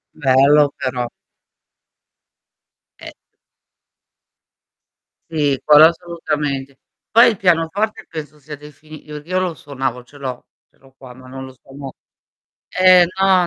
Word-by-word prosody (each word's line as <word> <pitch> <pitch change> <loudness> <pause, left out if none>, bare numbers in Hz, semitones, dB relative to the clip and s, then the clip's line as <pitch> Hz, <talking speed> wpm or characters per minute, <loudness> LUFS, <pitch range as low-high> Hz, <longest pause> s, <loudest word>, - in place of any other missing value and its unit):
Bello 140 +1 +3
però. 125 -1 -3 1.9
Eh. - - -10 2.2
Sì, 145 -4 0
quello 150 +1 +7
assolutamente. 150 -6 -4 0.3
Poi 235 +2 +6
il 210 - -7
pianoforte 195 +5 0
penso 155 -2 -9
sia 150 +1 -9
defini 150 +1 -15
io 150 0 -8
io 185 +3 -2
lo 180 -3 -2
suonavo, 135 -4 -5
ce 145 +4 -18
l'ho, 130 -3 -7 0.2
ce - - -36
l'ho 135 0 -23
qua 125 -2 -14
ma 130 0 -15
non 130 +1 -9
lo 130 - -12
suono 135 0 -11 0.8
eh 185 -1 +6
no, 190 -2 +3
150 Hz, 120 wpm, -18 LUFS, 135-170 Hz, 2.2 s, quello